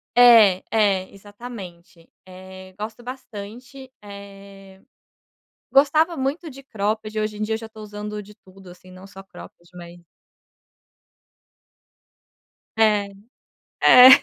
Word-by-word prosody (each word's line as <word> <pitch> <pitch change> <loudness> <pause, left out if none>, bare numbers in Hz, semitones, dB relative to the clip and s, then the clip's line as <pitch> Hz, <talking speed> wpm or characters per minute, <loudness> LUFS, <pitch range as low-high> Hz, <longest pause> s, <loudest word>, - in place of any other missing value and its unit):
É, 225 -6 +6
é 195 -4 +1
exatamente, 195 -5 -12 0.2
eh, 185 0 -13
gosto 220 +3 -7
bastante, 250 +2 -10
eh, 200 -1 -13 0.9
gostava 310 +5 +3
muito 280 +5 -3
de 275 0 -13
cropped, 215 -2 -4
hoje 215 -1 -3
em - - -4
dia 215 +1 -1
eu - - -3
já 225 - -9
estou 220 0 -13
usando 210 0 -7
de 210 +1 -16
tudo, 190 -2 -18
assim, 180 +1 -16
não 185 +1 -13
só 195 0 -13
cropped, 175 -2 -15
mas 175 0 -12 2.8
É, 210 -2 +2 0.7
é, 250 +1 +9
210 Hz, 115 wpm, -22 LUFS, 190-230 Hz, 2.8 s, é